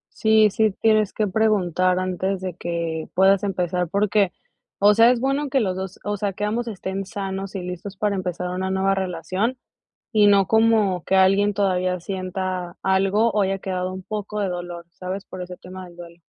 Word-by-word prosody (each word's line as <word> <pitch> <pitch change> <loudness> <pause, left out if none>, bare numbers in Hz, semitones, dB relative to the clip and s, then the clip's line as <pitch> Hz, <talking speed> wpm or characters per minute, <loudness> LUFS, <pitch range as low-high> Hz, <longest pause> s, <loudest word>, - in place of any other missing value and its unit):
Sí, 220 -1 +4
sí 220 +1 +2
tienes 215 -2 +3
que 215 - 0
preguntar 185 -4 +2
antes 185 +1 -1
de 185 -1 -4
que 170 -2 -4
puedas 190 +1 +4
empezar 180 -2 -1
porque, 200 0 +2 0.5
o 205 +1 +5
sea, 230 +2 +6
es 245 -1 +2
bueno 275 +3 0
que 270 0 +2
los 190 -6 0
dos 190 0 -6
o 205 0 -2
sea, 200 0 -2
que 205 - -5
ambos 235 +3 -2
estén 195 -2 -4
sanos 195 +1 -5
y 190 - -3
listos 180 +2 -7
para 205 0 0
empezar 180 -1 -3
una 185 +1 -2
nueva 190 +1 +1
relación 190 +5 -2 0.5
y 210 -1 +4
no 200 -2 +5
como 220 -5 +3
que 190 - 0
alguien 195 +2 +4
todavía 185 -2 0
sienta 185 -1 -4
algo 195 +4 +2
o 210 0 +2
haya 195 0 -1
quedado 185 -1 -3
un 190 - -6
poco 210 +2 -5
de 200 -2 0
dolor, 175 -1 -6
¿sabes?, 185 +3 -6
por 185 - -7
ese 180 0 -9
tema 185 +1 -10
del 175 -1 -14
duelo. 170 0 -12
190 Hz, 190 wpm, -23 LUFS, 180-205 Hz, 0.5 s, sea